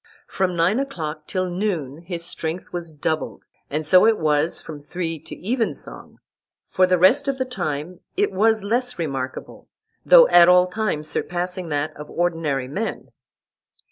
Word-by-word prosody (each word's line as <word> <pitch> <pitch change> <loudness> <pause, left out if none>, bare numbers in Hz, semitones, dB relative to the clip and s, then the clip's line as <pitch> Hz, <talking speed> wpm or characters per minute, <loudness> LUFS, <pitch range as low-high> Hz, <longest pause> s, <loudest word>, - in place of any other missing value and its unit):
From 185 -2 -1
nine 175 +8 +2
o'clock 155 - -5
till 185 0 -1
noon 175 -7 -2
his 170 -1 -5
strength 170 0 -5
was 170 -2 -4
doubled, 155 +1 -3 0.3
and 155 +2 -2
so 185 +7 +6
it 225 -1 +3
was 155 +1 +1
from 155 -2 -9
three 165 +1 -4
to 155 - -10
evensong; 235 -1 -3 0.5
for 185 0 +2
the 180 0 +3
rest 250 +11 +4
of 275 -1 0
the 260 - -1
time 175 - -4 0.2
it 410 +1 +2
was 220 +2 +2
less 245 +4 0
remarkable, 135 -6 -5 0.4
though - - +8
at 175 0 +7
all 180 0 +6
times 180 -6 -2
surpassing 180 +1 -3
that 145 0 -2
of 150 0 -10
ordinary 165 -6 -1
men. 200 +12 -4
175 Hz, 155 wpm, -22 LUFS, 155-200 Hz, 0.5 s, though